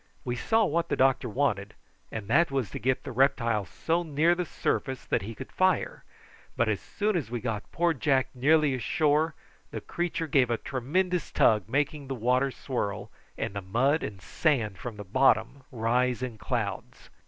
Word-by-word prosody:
We 120 - -1
saw 220 - +2
what 170 0 0
the - - +1
doctor 130 -2 +2
wanted, 105 -5 -1 0.4
and 110 -3 -5
that 165 +10 +4
was 135 -8 -2
to - - -5
get 130 +3 0
the 135 - -6
reptile 115 -5 +2
so 165 - -1
near 160 +1 +2
the 180 0 -2
surface 130 -2 -2
that - - 0
he 110 +4 -7
could 130 - -9
fire; 185 0 +1 0.5
but - - +2
as - - 0
soon 210 0 -2
as 155 -10 -1
we 120 0 -3
got 110 -3 -4
poor 170 0 +2
Jack 135 -2 +1
nearly 145 +2 +3
ashore 150 +6 +1 0.3
the - - -5
creature 175 -1 -3
gave 135 -4 +3
a 120 - +1
tremendous 175 +10 -1
tug, 105 -3 +3
making 145 +2 -1
the 135 - -3
water 125 +3 +2
swirl 120 -6 -4 0.3
and - - -3
the 100 - -4
mud 125 - +1
and 95 -4 -6
sand 110 - 0
from 115 +1 -6
the 105 - -6
bottom 125 +4 +2
rise 125 +1 +1
in 120 -4 -5
clouds. 110 -6 -4
130 Hz, 180 wpm, -28 LUFS, 115-150 Hz, 0.5 s, that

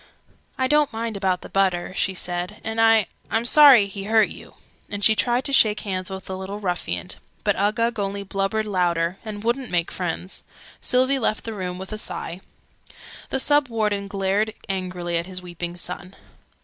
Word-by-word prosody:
"I 260 - +1
don't 295 +1 +3
mind 225 -1 -3
about 190 -2 0
the - - -9
butter," 185 -2 +1
she 190 +1 0
said, 180 +3 -3
"and 225 0 -1
I 225 -2 +5 0.2
I'm 225 +2 0
sorry 270 -5 +8
he 195 0 -7
hurt 220 0 +4
you!" - - -11 0.3
And 205 0 -2
she 220 - +7
tried 245 +3 +1
to 280 - -2
shake 215 -5 +4
hands 185 -2 -3
with 190 0 -7
the 190 - -5
little 190 +2 -6
ruffian: 175 - -3 0.3
but - - +2
Uggug 225 +3 +1
only 200 0 -2
blubbered 195 +2 -1
louder, 175 -3 0
and 210 -2 -7
wouldn't 245 +2 -1
make 170 -1 0
friends. 180 +1 -4 0.4
Sylvie 260 +2 +3
left 215 -3 0
the 225 - -5
room 180 -3 -4
with 190 +1 -8
a 215 - -4
sigh. 180 -3 -5 0.9
The 265 - 0
Sub 290 +1 +3
Warden 210 -3 -1
glared 200 +2 0
angrily 180 -3 -2
at 170 - -5
his 185 -1 -4
weeping 175 0 -6
son. 180 +2 -6
200 Hz, 180 wpm, -23 LUFS, 185-225 Hz, 0.9 s, sorry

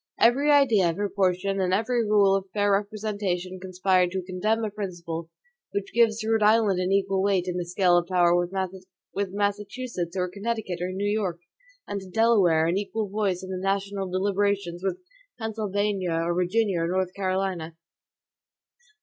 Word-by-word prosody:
Every 265 +6 +4
idea 230 -11 +4
of 165 - -2
proportion 195 -1 0
and 185 -1 0
every 235 +3 +1
rule 205 -2 +4
of 195 -1 -3
fair 205 0 +2
representation 200 -3 -2
conspire 185 0 +1
to 185 +1 -4
condemn 210 +5 -1
a 210 - -4
principle, 170 -5 -5 0.4
which 200 -1 -3
gives 230 -2 +4
to 220 - -3
Rhode 225 -1 +2
Island 210 -3 +4
an 185 +1 0
equal 195 -1 +1
weight 190 -2 +1
in 180 - -2
the 175 -1 -2
scale 175 0 +3
of 175 - -6
power 175 -2 +3
with 185 +1 -4
Massachusetts, 205 -2 -3
or 180 0 0
Connecticut, 200 -1 -3
or 180 +1 -2
New 195 +2 -2
York; 195 -5 -1 0.5
and 200 - -4
to 190 - -11
Delaware 195 -7 +3
an 175 +4 +1
equal 205 +1 -3
voice 195 -3 -1
in 185 - -7
the 185 -1 -4
national 195 0 -1
deliberations 195 -1 0
with 195 - -1 0.4
Pennsylvania, 205 -4 -1
or 165 +1 0
Virginia, 180 +2 +1
or 165 - 0
North 185 +1 -1
Carolina. 185 -4 -2
195 Hz, 165 wpm, -26 LUFS, 180-205 Hz, 0.5 s, Every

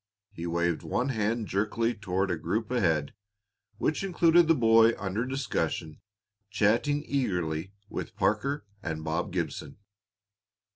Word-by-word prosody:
He 85 +1 -6
waved 85 -1 0
one 125 +3 -1
hand 110 -1 0
jerkily 110 +4 0
toward 95 -2 -1
a - - +1
group 100 +9 -2
ahead, 80 - +1 0.6
which 155 - 0
included 175 -3 +4
the 165 - +5
boy 115 -2 +5
under 100 +5 -2
discussion 110 - -2 0.5
chatting 115 +8 +2
eagerly 90 - -1
with - - -6
Parker 140 +8 0 0.2
and 80 -4 -4
Bob 80 +5 -2
Gibson. 90 -2 -4
105 Hz, 125 wpm, -28 LUFS, 85-125 Hz, 0.6 s, the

